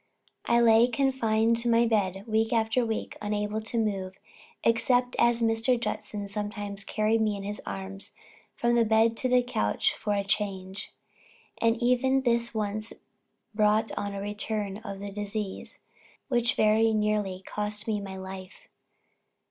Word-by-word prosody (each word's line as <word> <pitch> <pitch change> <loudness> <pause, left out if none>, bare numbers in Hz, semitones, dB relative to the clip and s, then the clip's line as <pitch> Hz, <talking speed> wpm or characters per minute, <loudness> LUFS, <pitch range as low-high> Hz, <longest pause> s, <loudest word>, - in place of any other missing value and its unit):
I 235 - +4
lay 230 0 +6
confined 230 -3 +1
to 235 +1 -1
my 230 0 +4
bed, 195 -4 0
week 220 0 +1
after 225 +1 +2
week, 225 -1 -3
unable 210 +1 -2
to 225 +2 -3
move, 195 -4 -1 0.5
except 245 +2 +2
as 235 0 +3
Mr. 225 +2 +2
Judson 210 -3 -3
sometimes 205 -1 -4
carried 215 +2 +1
me 210 -2 +1
in 195 - -7
his 205 +1 -5
arms 195 0 -7 0.4
from 240 0 +1
the 235 -1 +4
bed 225 +1 +3
to 255 - 0
the 250 0 +4
couch 105 - 0
for 210 - -2
a 200 - 0
change; 195 -1 -3 0.7
and 230 0 +3
even 260 +2 +2
this 235 -1 +2
once 215 0 -3 0.6
brought 215 +1 +2
on 200 0 -3
a 195 - -4
return 205 -1 -3
of 205 -3 -7
the 200 0 -5
disease, 205 0 -5 0.5
which 240 -2 +2
very 220 +1 +3
nearly 210 -3 0
cost 210 +1 -3
me 210 -2 -1
my 195 -1 -7
life. 190 - -9
215 Hz, 150 wpm, -28 LUFS, 205-230 Hz, 0.7 s, lay